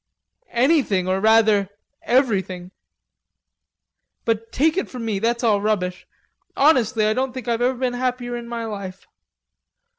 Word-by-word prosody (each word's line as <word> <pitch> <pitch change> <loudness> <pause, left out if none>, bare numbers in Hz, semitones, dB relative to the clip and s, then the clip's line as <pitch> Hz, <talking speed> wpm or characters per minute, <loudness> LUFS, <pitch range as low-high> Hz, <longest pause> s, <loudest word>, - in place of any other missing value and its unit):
"Anything, 240 - +2
or 190 +1 +1
rather 215 -2 +4 0.3
everything! 195 -8 0 1.5
But 225 0 -1
take 310 +7 +2
it 385 - -2
from 245 -3 -6
me, 210 -3 -1
that's 235 +3 -1
all 210 -3 +3
rubbish. 180 -4 -2 0.5
Honestly 255 -6 +3
I 215 - +2
don't 260 +2 -2
think 255 -3 -7
I've 235 0 0
ever 250 +1 +1
been 250 -1 -1
happier 245 -1 -2
in 235 0 -7
my 235 -1 -4
life.... 200 -4 -7
230 Hz, 140 wpm, -22 LUFS, 205-250 Hz, 1.5 s, rather